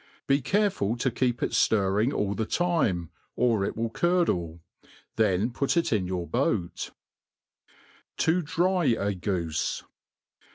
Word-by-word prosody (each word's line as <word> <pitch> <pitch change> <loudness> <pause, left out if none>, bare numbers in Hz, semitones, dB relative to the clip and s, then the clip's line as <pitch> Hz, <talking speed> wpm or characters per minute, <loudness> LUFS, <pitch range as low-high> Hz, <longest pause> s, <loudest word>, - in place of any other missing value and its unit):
Be 140 +1 +2
careful 185 - +1
to 130 +1 0
keep 120 0 0
it - - 0
ftirring 105 +3 +2
all 100 -7 -1
the 110 +1 -2
time^ 135 - 0 0.3
or 115 -4 +2
it - - -2
vill 115 0 -2
curdle 95 - 0 0.2
^ - - -26 0.3
then 105 +1 +2
put 140 +7 0
it 170 - +2
in 95 -4 0
your 90 -2 -2
boat* 115 - -1 1.3
To 170 +3 +2
dry 175 +3 +1
a 100 -5 +1
Goofe. 90 -4 -2
115 Hz, 135 wpm, -27 LUFS, 95-150 Hz, 1.3 s, Be